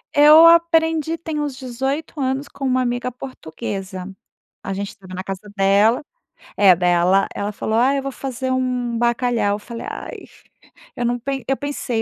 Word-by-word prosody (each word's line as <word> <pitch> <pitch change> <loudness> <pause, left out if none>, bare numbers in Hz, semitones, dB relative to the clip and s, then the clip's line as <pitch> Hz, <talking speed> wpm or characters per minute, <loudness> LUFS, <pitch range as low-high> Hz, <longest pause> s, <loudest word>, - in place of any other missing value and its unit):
Eu 300 +3 +8
aprendi 325 -1 +4
tem 320 -2 -4
uns 290 -3 -3
18 270 +5 -4
anos 265 +2 -1
com 280 - -11
uma 255 0 +2
amiga 245 +1 -2
portuguesa, 195 -6 -7 0.6
a 195 - -4
gente 200 +1 -3
estava 185 -2 -13
na 185 0 -5
casa 195 +2 -7
dela 200 +6 +3 0.5
é, 195 -3 +6
dai 180 0 +1
ela 185 +3 +3
ela 205 +1 -2
falou: 220 +1 -3
“Ah 255 +4 +3
eu - - -1
vou 275 0 -5
fazer 260 -1 -4
um 250 -2 -1
bacalhau”, 235 -3 +1
eu - - -7
falei: 230 +2 -8
"Ai," - - -7 0.8
eu 245 - -2
não, 245 +1 0
pen 270 +1 -4
eu 270 0 0
pensei: 285 -4 -3
245 Hz, 175 wpm, -20 LUFS, 205-275 Hz, 0.8 s, Eu